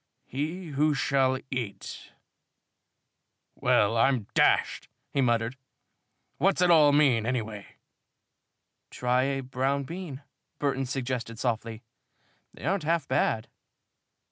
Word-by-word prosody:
He 160 +6 -4
who 150 +1 +1
shall 135 -1 +2
eat 120 -6 -5 0.6
" - - -39
"Well, 105 +2 +3
I'm 125 0 +3
d - - -25
d!" - - +3 0.7
he 140 - +1
muttered. 120 0 +1 0.8
"What's 195 +1 +2
it 180 -1 +4
all 150 -3 +7
mean, 135 -7 +3
anyway?" 110 -5 -4 1.1
"Try 125 +1 +1
a 135 0 -1
brown 135 +2 -1
bean," 160 -3 -7 0.3
Burton 135 -2 -1
suggested 125 -3 -3
softly. 115 -1 -3 0.7
"They - - -11
aren't 190 +3 +1
half 160 -1 0
bad." 110 - 0
135 Hz, 115 wpm, -28 LUFS, 120-145 Hz, 1.1 s, all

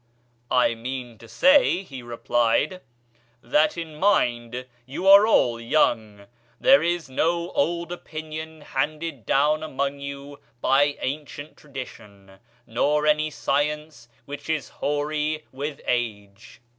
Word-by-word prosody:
'I 125 -2 +3
mean 120 0 -6
to 115 - -13
say,' 270 - +4
he 135 -8 -9
replied, 120 +7 0 0.6
'that 150 +7 +2
in 160 -2 -6
mind 125 - +1 0.2
you 145 +8 -4
are 200 +2 +9
all 120 - +3
young; 110 -6 +1 0.3
there 270 +1 +6
is 170 -3 -1
no 170 +6 0
old 170 +3 -1
opinion 160 -2 -7
handed 150 -2 -3
down 150 +2 +3
among 140 -2 -3
you 140 0 -8 0.2
by 145 +3 +3
ancient 145 +1 -5
tradition, 100 -9 -11 0.3
nor 150 +6 +1
any 155 0 +2
science 150 -3 -2 0.2
which 145 +2 -8
is 155 -4 -1
hoary 150 +1 -2
with 140 +2 -5
age. 105 -4 -4
145 Hz, 120 wpm, -24 LUFS, 120-155 Hz, 0.6 s, are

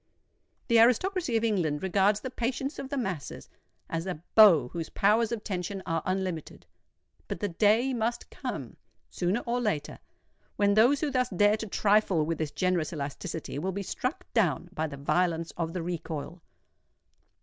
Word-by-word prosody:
The 235 -2 +5
aristocracy 255 - +3
of 225 - -1
England 175 -9 0
regards 200 +2 +2
the 260 - -5
patience 260 +4 -3
of 265 - -6
the 280 - -3
masses 190 - -4 0.4
as 165 +2 -3
a 175 -3 -5
bow 170 - +7
whose 165 +1 -5
powers 220 +3 +2
of 225 -3 -3
tension 190 0 -4
are 165 -2 -1
unlimited: 185 -4 -3 0.6
but - - -4
the 205 - -1
day 220 +8 +3
must 235 0 -2
come, - - -6 0.3
sooner 185 +6 0
or 245 +1 -1
later, 155 -10 -2 0.6
when 200 0 +3
those 245 +7 +4
who 300 -2 0
thus 255 -1 +1
dare 205 +2 +3
to 220 - -5
trifle 200 -5 +2
with 165 0 -2
this 155 -2 -1
generous 180 -1 0
elasticity 145 0 -5
will 185 +4 -2
be 200 +1 -3
struck 255 - -3
down 175 - +1
by 160 -4 -1
the 140 -2 -8
violence 165 +3 0
of 165 -1 -2
the 175 -1 -4
recoil. 165 -1 -5
195 Hz, 165 wpm, -28 LUFS, 165-230 Hz, 0.6 s, bow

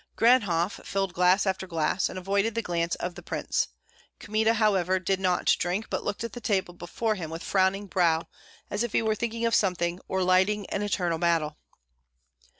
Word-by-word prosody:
Ganhoff 205 -7 +3
filled 195 -2 -2
glass 180 +3 +3
after 190 -1 -1
glass, 165 +2 0
and - - -7
avoided 200 +4 0
the 230 - -1
glance 170 -2 -1
of 180 - -4
the - - -10
prince. - - -1 0.5
Kmita, 220 +2 +1
however, 190 -4 +2
did 190 +1 -1
not 185 -2 +2
drink, 180 +5 -2
but - - -2
looked 205 - -3
at 230 - -5
the 245 - -7
table 190 -5 0
before 195 +6 -2
him 175 -6 -5
with 165 +1 -6
frowning 195 +1 +1
brow, 170 -4 +1 0.4
as 205 - -1
if 240 -2 -2
he - - +2
were 220 -1 +2
thinking 230 +1 -2
of 230 - +1
something, 180 -4 +1
or 190 0 0
lighting 190 +3 +2
an 200 - -1
internal 180 -5 -1
battle. 165 -3 +1
190 Hz, 185 wpm, -27 LUFS, 175-210 Hz, 0.5 s, Ganhoff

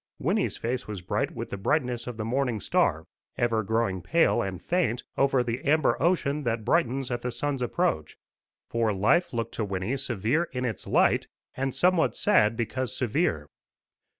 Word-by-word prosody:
Wynnie's - - 0
face 125 +2 -3
was 100 -4 -6
bright - - -1
with - - -7
the 100 - -3
brightness 125 +2 0
of 120 -2 -5
the 110 - -3
morning 125 -1 0
star, - - +1 0.3
ever 115 -2 +1
growing 110 -3 0
pale 165 - +3
and 95 -2 -4
faint 125 - 0
over 135 -2 +3
the 120 0 -3
amber 155 0 +3
ocean 155 -4 +1
that 115 -4 -2
brightens 135 -5 +1
at 120 -1 -2
the 125 - -2
sun's 140 +1 -2
approach; 120 - -1 0.5
for 115 -2 +1
life 105 - +3
looked 115 -1 -3
to 110 - -2
Wynnie 100 +5 -2
severe 130 - 0
in 125 0 -2
its 115 -5 -4
light, - - +3 0.3
and 135 +1 -1
somewhat 180 -2 +3
sad 115 - +3
because 125 +2 -2
severe. 120 - 0
120 Hz, 170 wpm, -27 LUFS, 110-140 Hz, 0.5 s, pale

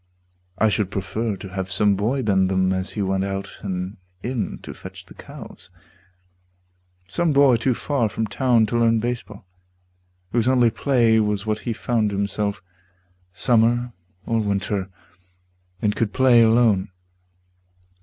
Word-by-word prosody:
I 110 - +3
should 105 -2 0
prefer 105 +3 -3
to 95 - -9
have 95 0 -5
some 100 +1 +2
boy 120 +7 -1
bend 95 -3 +2
them 95 0 +2
As 95 0 -3
he 105 - -2
went 95 0 0
out 95 0 -4
and 95 -1 -4 0.3
in 125 -2 -3
to - - -7
fetch - - -11
the - - -15
cows - - -11 1.4
Some 155 - 0
boy 140 -3 +6
too 120 +2 0
far 130 -6 0
from 110 - -2
town 115 +2 +2
to 120 +3 -1
learn 115 -1 +3
baseball, 115 -4 -5 0.9
Whose 120 0 +1
only 125 -3 +4
play 115 -5 +3
was 105 -1 0
what 110 0 -1
he - - 0
found 110 -1 0
himself, 100 0 -2 0.7
Summer 120 +4 +2 0.3
or 115 0 0
winter, 100 -2 -1 0.9
and 105 -1 +1
could 110 -3 -1
play 130 -3 +5
alone. 110 -4 +3
110 Hz, 145 wpm, -22 LUFS, 100-120 Hz, 1.4 s, boy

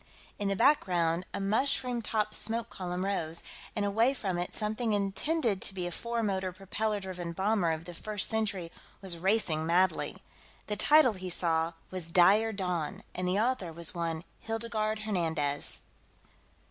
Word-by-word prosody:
In 205 - -1
the 195 - +1
background, 180 - +2
a - - -3
mushroom 240 +4 +1
topped 215 -1 -1
smoke 230 +1 +2
column 180 0 -3
rose, 170 -5 0 0.3
and 210 -2 0
away 225 +7 +3
from 190 -7 -2
it 175 - -3
something 215 +1 0
intended 205 - +1
to 195 - 0
be 180 -2 -2
a 175 - -3
four 235 +5 -2
motor 190 -3 -1
propeller 205 +3 -2
driven 180 -3 -5
bomber 195 -1 +1
of 160 +1 -4
the 175 - -8
First 210 +3 -1
Century 200 -6 -1 0.3
was 175 -3 -4
racing 185 -4 +1
madly. 180 +3 +2 0.5
The 210 - -2
title, 290 +2 +5
he 185 -1 -6
saw, 165 -1 +1 0.2
was 180 -3 -4
Dire 200 +6 +5
Dawn, 180 -6 -2
and 180 0 -2
the 185 +2 +1
author 220 -6 0
was 170 0 0
one 165 -2 -2 0.2
Hildegarde 220 -1 -2
Hernandez. 160 -8 0
195 Hz, 160 wpm, -30 LUFS, 175-220 Hz, 0.5 s, title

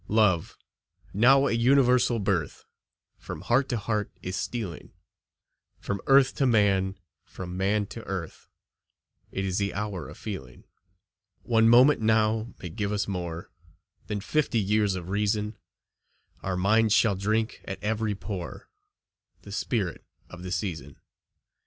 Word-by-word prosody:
Love, 100 -6 +2 0.6
now 135 +6 +5
a - - +1
universal 125 0 +4
birth, 95 -8 -2 0.5
From - - -7
heart 130 +3 +2
to 120 - 0
heart 105 -1 -2
is 95 +1 -3
stealing, 105 -9 -5 0.9
From 100 -1 -3
earth 135 -1 +5
to 135 - +3
man, 100 -4 +2 0.3
from 90 -1 -8
man 100 +2 +1
to 115 +3 -9
earth; 95 -4 -6 0.8
It 95 - -2
is 95 0 -1
the 100 -3 -1
hour 100 -3 -4
of - - -11
feeling. 65 - -7 0.8
One 115 -1 +4
moment 125 +3 +6
now 110 +1 +2
may 90 - -6
give 100 +5 -3
us 105 -1 -1
more 85 -3 -5 0.6
Than 105 -1 -3
fifty 125 +2 +1
years 105 -1 +1
of 90 -1 -6
reason; 105 +1 0 0.9
Our 95 -1 -2
minds 110 +3 +3
shall 110 -3 +4
drink 110 +4 -1
at 95 - -5
every 110 0 -1
pore 95 -3 -7 0.7
The 100 - -10
spirit 100 -3 -2 0.3
of 90 - -10
the 90 0 -6
season. 80 -7 -4
105 Hz, 135 wpm, -27 LUFS, 95-115 Hz, 0.9 s, moment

